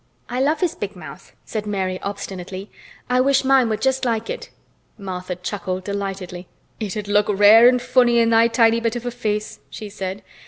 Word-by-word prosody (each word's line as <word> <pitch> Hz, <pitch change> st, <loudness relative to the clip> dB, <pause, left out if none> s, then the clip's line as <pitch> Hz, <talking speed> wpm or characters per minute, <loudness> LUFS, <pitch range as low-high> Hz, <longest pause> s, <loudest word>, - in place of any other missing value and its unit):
"I 245 Hz, -, -2 dB
love 295 Hz, +6 st, +1 dB
his 350 Hz, -3 st, +1 dB
big -, -, -6 dB
mouth," -, -, -11 dB
said 215 Hz, -1 st, -4 dB
Mary 190 Hz, -2 st, -2 dB
obstinately. 195 Hz, -1 st, -6 dB, 0.4 s
"I 250 Hz, 0 st, +2 dB
wish 275 Hz, +1 st, +3 dB
mine 265 Hz, -3 st, +4 dB
were 215 Hz, -, 0 dB
just 265 Hz, +2 st, 0 dB
like 230 Hz, -2 st, -1 dB
it." -, -, -7 dB, 0.5 s
Martha 185 Hz, -2 st, -5 dB
chuckled 185 Hz, 0 st, -4 dB
delightedly. 190 Hz, -3 st, -5 dB, 0.3 s
"It'd 210 Hz, -1 st, -4 dB
look 205 Hz, 0 st, +2 dB
rare 210 Hz, +3 st, +7 dB
an' 250 Hz, 0 st, +5 dB
funny 245 Hz, -1 st, +3 dB
in 230 Hz, -1 st, +3 dB
thy 230 Hz, 0 st, +5 dB
bit 230 Hz, 0 st, +2 dB
of 240 Hz, 0 st, -5 dB
a 245 Hz, -, -2 dB
face," 215 Hz, -3 st, -3 dB
she 215 Hz, -, -8 dB
said. 190 Hz, 0 st, -6 dB
215 Hz, 180 wpm, -21 LUFS, 195-240 Hz, 0.5 s, rare